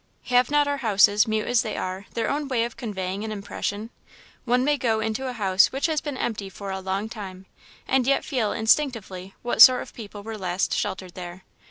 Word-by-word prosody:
Have 250 0 +4
not 295 0 +3
our 285 0 0
houses, 210 -2 +4
mute 220 -1 0
as 245 -2 +3
they 220 - -4
are, 185 +2 -4
their 230 - 0
own 290 0 -1
way 250 -4 +1
of 235 0 -4
conveying 195 -4 -4
an 220 - -4
impression? 210 +1 -4 0.5
One 250 +1 +2
may 295 +2 +2
go 230 -5 0
into 220 +4 -2
a 255 - -3
house 195 -4 +3
which 270 +1 -2
has 315 -3 0
been 290 -4 -5
empty 210 -6 -3
for 195 0 -7
a 190 - -3
long 190 +3 -3
time, 190 -4 -8 0.4
and 260 -2 +2
yet 275 - +2
feel, 245 -8 -1
instinctively, 220 -6 0
what 240 -2 +1
sort 255 +1 +9
of - - -15
people 205 -2 -9
were 220 0 -6
last 180 0 -1
sheltered 185 -2 -3
there. 180 0 -9
220 Hz, 210 wpm, -24 LUFS, 195-250 Hz, 0.5 s, sort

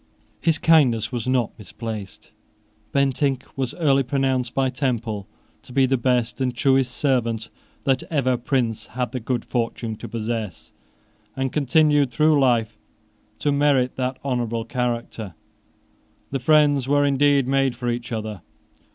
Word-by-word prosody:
His 165 -2 +2
kindness 140 -9 +3
was 120 -1 -3
not 125 -3 +1
misplaced. 105 -2 -8 0.6
Bentinck 135 -1 +1
was 130 -2 -3
early 140 -5 +3
pronounced 130 -2 -1
by 135 -1 +1
Temple 115 -6 -2 0.3
to - - -15
be 135 +1 +3
the 135 +1 +2
best 125 0 0
and 125 -2 0
truest 130 -1 +2
servant 115 -5 0 0.3
that 135 -1 +2
ever 135 -5 +1
prince 120 -3 -1
had 125 -2 -1
the 130 - -3
good 120 0 -2
fortune 115 -2 -2
to - - -8
possess, 110 -5 -4 0.6
and 135 -1 -2
continued 145 0 +3
through 150 +5 +3
life 115 -5 +1 0.6
to 145 - 0
merit 140 -3 +2
that 130 0 -2
honourable 120 -4 -1
character. 120 - -3 1.0
The 135 - -1
friends 145 -1 +3
were 145 +1 +3
indeed 140 -1 +3
made 135 -2 +1
for 120 0 -5
each 120 0 -3
other. 110 -4 -4
130 Hz, 140 wpm, -23 LUFS, 115-135 Hz, 1.0 s, kindness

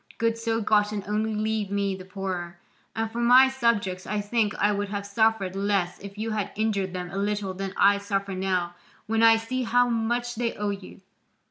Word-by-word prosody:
Goods 230 0 0
so 225 0 0
gotten 210 -1 +1
only 215 +1 -1
leave 215 -1 -1
me 200 -1 0
the 185 -1 -10
poorer. 185 -3 -5 0.4
And 225 0 -2
for 235 - -4
my 250 +2 +7
subjects 230 -8 0
I 210 +2 -1
think 210 0 0
I 210 - +3
would 205 0 -2
have 200 0 -4
suffered 200 -2 +1
less 195 -3 0
if 200 +1 -10
you 220 +1 -3
had 215 -2 -2
injured 200 -3 -1
them 180 -1 -5
a 195 - -5
little 205 -1 -1
than 195 +1 -4
I 200 0 +5
suffer 200 -1 -2
now 185 -2 -1 0.3
when 225 +1 0
I 225 0 +7
see 255 +3 -3
how 245 +1 +3
much 240 +1 -1
they 235 0 -2
owe 210 0 -1
you. 195 -1 -9
205 Hz, 200 wpm, -26 LUFS, 195-225 Hz, 0.4 s, my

